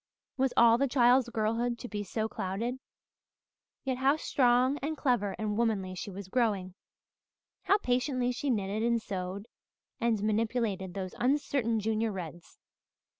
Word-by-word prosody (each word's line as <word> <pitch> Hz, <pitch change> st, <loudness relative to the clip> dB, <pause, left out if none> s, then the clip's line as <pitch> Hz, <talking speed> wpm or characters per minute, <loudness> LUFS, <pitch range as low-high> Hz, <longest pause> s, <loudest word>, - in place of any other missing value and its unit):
Was 265 Hz, -1 st, +1 dB
all 235 Hz, 0 st, +6 dB
the 275 Hz, -, +2 dB
child's 245 Hz, -1 st, +4 dB
girlhood 230 Hz, +2 st, 0 dB
to 245 Hz, -, -7 dB
be 210 Hz, -3 st, -4 dB
so 220 Hz, +2 st, -2 dB
clouded? 220 Hz, +6 st, -3 dB, 1.0 s
Yet 260 Hz, -2 st, -1 dB
how 270 Hz, +2 st, +4 dB
strong 255 Hz, -1 st, +2 dB
and 305 Hz, +3 st, -3 dB
clever 240 Hz, -7 st, +1 dB
and 210 Hz, -1 st, -2 dB
womanly 205 Hz, -5 st, 0 dB
she 185 Hz, -, -6 dB
was 195 Hz, 0 st, -8 dB
growing! 200 Hz, -5 st, 0 dB, 0.9 s
How 400 Hz, -, +5 dB
patiently 250 Hz, -5 st, 0 dB
she 275 Hz, +3 st, -3 dB
knitted 205 Hz, -2 st, -1 dB
and 235 Hz, 0 st, +2 dB
sewed 195 Hz, 0 st, -5 dB, 0.5 s
and 225 Hz, -3 st, +1 dB
manipulated 215 Hz, -3 st, -1 dB
those 185 Hz, -2 st, -4 dB
uncertain 255 Hz, -3 st, +1 dB
Junior 220 Hz, +1 st, 0 dB
Reds! 175 Hz, -3 st, -8 dB
230 Hz, 140 wpm, -30 LUFS, 200-250 Hz, 1.0 s, all